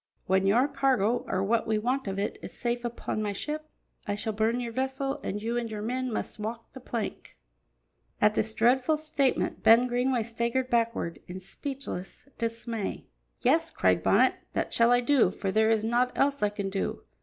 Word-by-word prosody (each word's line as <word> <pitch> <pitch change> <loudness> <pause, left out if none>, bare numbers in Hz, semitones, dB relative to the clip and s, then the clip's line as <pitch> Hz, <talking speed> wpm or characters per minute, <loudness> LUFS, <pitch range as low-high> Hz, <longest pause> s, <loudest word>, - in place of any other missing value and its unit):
When 190 0 +2
your 240 +7 +4
cargo, 260 -5 +1
or 185 0 0
what 225 +3 +1
we 220 -1 +2
want 250 +3 -1
of 195 0 -3
it, 200 +1 -2
is - - -8
safe 240 0 -2
upon 235 -2 -3
my 205 -1 -1
ship, 305 +8 -4 0.4
I 205 - 0
shall 220 +1 -2
burn 220 +3 +1
your 240 -1 -4
vessel, 265 +2 -2
and 205 - -3
you 230 +3 -2
and 235 -1 -2
your 210 -1 -5
men 255 +2 -2
must 215 - -4
walk 225 +2 -6
the 265 - -9
plank." 235 -4 -5 0.8
At 210 0 +4
this 220 +1 0
dreadful 255 +6 +3
statement, 300 -4 0
Ben 230 +2 +7
Greenway 250 0 +1
staggered 235 +3 -1
backward 230 -7 0
in 180 +1 -6
speechless 265 0 -6
dismay. 230 -2 -3 0.4
"Yes," - - +3
cried 95 -1 +2
Bonnet, 250 +6 +4 0.2
"that - - -1
shall 235 +1 +5
I 245 0 +5
do, 260 -6 +4
for 195 0 -3
there 220 +2 +3
is 220 -1 +2
naught 245 +2 +2
else 280 0 +1
I 210 - +3
can 200 -1 -4
do. 195 - -3
230 Hz, 190 wpm, -28 LUFS, 210-255 Hz, 0.8 s, Ben